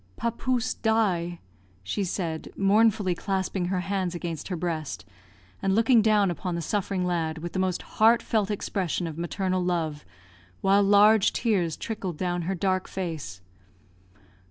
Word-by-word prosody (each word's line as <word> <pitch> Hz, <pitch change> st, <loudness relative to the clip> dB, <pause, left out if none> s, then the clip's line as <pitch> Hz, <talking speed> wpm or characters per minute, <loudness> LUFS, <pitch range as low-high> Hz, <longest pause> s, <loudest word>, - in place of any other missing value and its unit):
"Papouse 245 Hz, +1 st, -1 dB
die," 185 Hz, -7 st, 0 dB, 0.4 s
she 195 Hz, -, -2 dB
said, 170 Hz, -3 st, -3 dB
mournfully 200 Hz, -1 st, +3 dB
clasping 190 Hz, 0 st, -2 dB
her 180 Hz, 0 st, -1 dB
hands 185 Hz, -1 st, -2 dB
against 165 Hz, -3 st, -5 dB
her 185 Hz, -, -3 dB
breast, 160 Hz, -, -4 dB, 0.6 s
and 195 Hz, 0 st, +1 dB
looking 230 Hz, +1 st, +5 dB
down 210 Hz, -3 st, +3 dB
upon 175 Hz, +2 st, -3 dB
the 170 Hz, -, -2 dB
suffering 195 Hz, 0 st, -1 dB
lad 165 Hz, -3 st, -1 dB
with 170 Hz, +2 st, -6 dB
the 190 Hz, -, -1 dB
most 185 Hz, -1 st, -1 dB
heartfelt 220 Hz, -2 st, +2 dB
expression 190 Hz, -4 st, -2 dB
of 160 Hz, -1 st, -6 dB
maternal 185 Hz, +1 st, -1 dB
love, 160 Hz, -4 st, -1 dB, 0.6 s
while 195 Hz, +1 st, +4 dB
large 205 Hz, +1 st, +5 dB
tears 185 Hz, -, 0 dB
trickled 195 Hz, -7 st, -4 dB
down 175 Hz, 0 st, -1 dB
her 195 Hz, -, 0 dB
dark 185 Hz, +1 st, 0 dB
face. 160 Hz, -, -5 dB
185 Hz, 140 wpm, -26 LUFS, 170-205 Hz, 0.6 s, looking